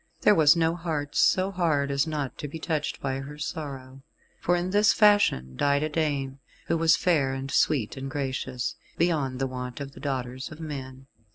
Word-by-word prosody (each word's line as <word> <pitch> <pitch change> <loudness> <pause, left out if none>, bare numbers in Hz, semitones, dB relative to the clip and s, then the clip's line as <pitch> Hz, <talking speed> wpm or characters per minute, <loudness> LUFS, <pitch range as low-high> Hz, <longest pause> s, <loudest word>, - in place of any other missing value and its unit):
There - - +6
was 155 -4 +6
no 165 -1 +2
heart 155 -4 -4
so 190 +1 +3
hard 155 -7 +1
as 140 +3 +1
not 150 -4 -3
to 150 - -4
be 145 - -7
touched 160 -2 -2
by 135 -1 -2
her 140 +2 -8
sorrow; 135 -3 -6 0.4
for 175 - +2
in 175 +1 -1
this 210 +2 +4
fashion 205 - +3
died 140 - +2
a 155 - -1
dame, 140 -4 -1 0.3
who - - 0
was 165 0 +5
fair 145 -7 +2
and 135 +1 -5
sweet 130 -8 +1
and 135 0 -5
gracious, 130 -3 -3 0.2
beyond 150 -7 +1
the 135 - 0
wont 125 -1 -5
of 140 -1 -6
the - - -13
daughters 130 -1 -4
of 155 - -10
men. 135 -4 -7
145 Hz, 190 wpm, -26 LUFS, 135-160 Hz, 0.4 s, There